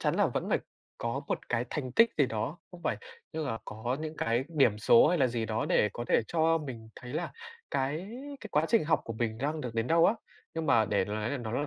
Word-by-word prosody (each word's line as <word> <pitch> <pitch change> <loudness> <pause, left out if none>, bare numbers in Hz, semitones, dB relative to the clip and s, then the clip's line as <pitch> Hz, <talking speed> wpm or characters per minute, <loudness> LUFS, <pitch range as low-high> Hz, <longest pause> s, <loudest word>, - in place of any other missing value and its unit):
chắn - - +1
là - - +4
vẫn - - -2
phải - - +3 0.4
có - - -2
một - - -3
cái 120 0 +1
thành 130 -5 -3
tích 230 - +6
gì 140 - +5
đó 120 +9 -3
không 175 -1 -12
phải, 110 - 0 0.4
tức 160 0 -2
là 115 -2 -2
có 120 +5 -3
những 155 0 -5
cái 115 0 +1
điểm 135 -10 +3
số 115 +5 +6
hay 175 0 +2
là 130 - +5
gì 115 -2 -2
đó 110 0 -1
để 105 - +4
có 120 - -4
thể - - +4
cho 165 0 +3
mình 125 -7 -7
thấy 125 +1 -9
là 160 +3 -2 0.4
cái 145 +7 -1 0.3
cái 215 - -8
quá 150 -1 +3
trình 225 -8 +4
học 160 -4 +2
của 115 - -4
mình 110 0 -2
đang 150 +4 -1
được 120 -4 -5
đến 115 0 0
đâu 165 +3 +5
á. 210 - +3 0.4
Nhưng 160 -1 -2
mà 115 -6 +5
để 100 -3 +1
mà 105 - -5
nói 110 +1 -2
là 145 - -1
nó 115 -3 -5
là 145 +4 0
130 Hz, 260 wpm, -30 LUFS, 115-160 Hz, 0.4 s, tích